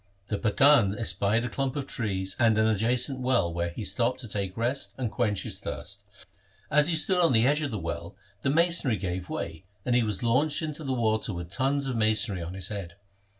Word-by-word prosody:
The 105 - -2
Pathan 110 -2 +4
espied 115 0 +1
a - - -1
clump 135 +2 -2
of 140 -2 -3
trees 95 -7 0
and 115 -3 +4
an 110 - +3
adjacent 120 +5 +2
well 125 -10 +1
where 85 0 -2
he 85 +6 -7
stopped 125 +3 0
to 120 - -8
take 100 -2 -4
rest 120 +4 -1
and 125 -4 -3
quench 105 -5 -1
his - - -4
thirst. 95 +8 -7 0.7
As 150 +1 +6
he 170 - +2
stood 180 +3 +4
on 165 -6 +4
the 115 0 +4
edge 145 +3 +3
of 145 - -2
the 110 - -4
well 85 +1 -5 0.3
the 140 - 0
masonry 165 -6 +2
gave 90 -1 -4
way, 80 +1 -5 0.2
and 125 - +1
he 125 - +4
was 105 -3 -2
launched 145 +7 +1
into 155 0 -4
the 135 -2 -2
water 110 -4 0
with 85 0 -7
tons 135 +6 0
of 130 -3 -2
masonry 110 -3 +1
on 85 +2 -6
his 95 -1 -2
head. 95 -5 -6
115 Hz, 215 wpm, -27 LUFS, 95-135 Hz, 0.7 s, As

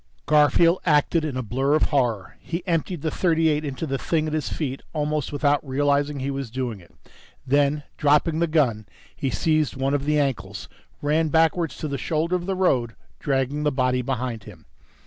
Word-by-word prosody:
Garfield 160 +4 +4
acted 155 0 +2
in 145 -5 -3
a 130 - -2
blur 135 +6 +1
of 155 - +2
horror. 120 -8 0
He 170 +1 -5
emptied 170 -2 -1
the 160 - -1
.38 160 -3 +1
into 140 +1 -4
the 135 -3 -2
thing 160 -2 0
at 155 - -3
his 155 -1 -1
feet 135 -4 -4
almost 150 -2 -1
without 145 0 +1
realizing 145 +1 0
he 135 +1 -2
was 135 -3 -4
doing 120 -3 -4
it. 85 - -19 0.5
Then, 145 +2 +2
dropping 150 +2 +2
the 170 - +2
gun, 125 -10 +1 0.3
he 135 - -2
seized 155 +3 +1
one 135 +1 -1
of 140 -1 0
the 150 0 +2
ankles, 105 -9 -2 0.4
ran 155 +2 +2
backwards 165 +2 +2
to 155 - -4
the 140 -2 -3
shoulder 165 +6 0
of 180 0 -3
the 195 - -1
road, 125 -11 +1 0.2
dragging 135 +1 -1
the 150 0 +1
body 130 -1 +1
behind 125 -4 -3
him. 90 -7 -13
145 Hz, 185 wpm, -24 LUFS, 130-155 Hz, 0.5 s, Garfield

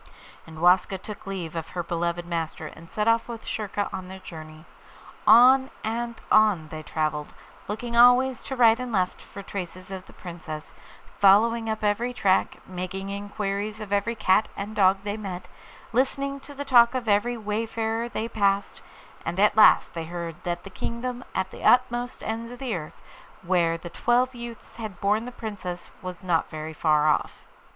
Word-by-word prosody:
And 160 -1 -10
Waska 180 +2 +4
took 205 +1 -9
leave 180 -4 -5
of 165 -1 -4
her 175 -1 -3
beloved 170 0 -2
master, 165 -2 -3
and 165 +2 -11
set 210 0 -1
off 230 0 +3
with 230 -2 -7
Schurka 205 -1 -2
on 185 -1 -5
their 190 +1 -8
journey. 155 -3 -11 0.6
On 260 +3 +7
and 235 +1 -3
on 205 -8 +4
they 155 -2 -6
travelled, 155 -1 -3 0.3
looking 235 +3 -4
always 245 +1 +6
to 265 - -4
right 230 -2 +5
and 250 -1 -4
left 185 -4 0
for 200 - -10
traces 185 -1 -7
of 190 -1 -7
the - - -15
Princess, 165 -3 -8 0.5
following 225 +3 +5
up 220 0 -3
every 225 +4 +1
track, 190 -4 +2
making 185 +1 -5
inquiries 205 +1 -3
of 210 -2 -5
every 205 +4 +1
cat 210 -1 +3
and 205 +2 -5
dog 190 -1 +5
they 205 +1 -3
met, 185 -4 -6 0.5
listening 275 +3 0
to 285 +1 -13
the 285 +1 -5
talk 240 -2 +6
of 250 -3 -2
every 220 +4 +2
wayfarer 225 +2 -2
they 225 -1 -3
passed; 200 -3 0 0.4
and 170 +3 -3
at 210 +1 +4
last 215 - +6
they 165 -1 -4
heard 170 -1 -5
that 175 0 -3
the 195 - -10
kingdom 245 +5 -4
at 190 0 -1
the - - -10
utmost 245 0 +2
ends 230 +2 -4
of 245 - -8
the 255 -4 -3
earth 155 -3 -7 0.4
where 170 -2 +2
the 170 0 -9
twelve 245 +6 +2
youths 235 -2 -9
had 215 -6 -7
borne 210 +3 +1
the 250 - -6
Princess 200 -7 -6
was 185 -1 -7
not 175 -3 +1
very 155 0 -6
far 155 -1 +2
off. 150 - 0
205 Hz, 175 wpm, -26 LUFS, 175-230 Hz, 0.6 s, On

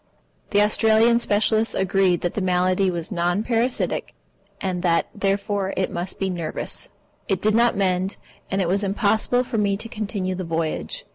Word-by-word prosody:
The 205 0 +4
Australian 220 +2 +4
specialists 220 0 +2
agreed 190 -2 +2
that 175 - -1
the 210 - -2
malady 185 +1 +2
was 170 0 -4
non 175 +2 0
parasitic, 240 +2 0 0.4
and 185 -2 -2
that, 170 -2 +1
therefore, 200 0 -1
it 190 - 0
must 175 +2 -4
be 195 - -1
nervous. 170 -3 -4 0.4
It 195 -3 0
did 215 +2 +2
not 235 -1 +3
mend, 185 0 0 0.3
and 195 0 0
it - - -1
was 195 +4 +1
impossible 215 +5 +1
for 230 -3 -2
me 200 -1 +1
to 225 - -6
continue 205 -4 -3
the 185 0 -4
voyage. 165 -1 -3
195 Hz, 165 wpm, -23 LUFS, 180-215 Hz, 0.4 s, The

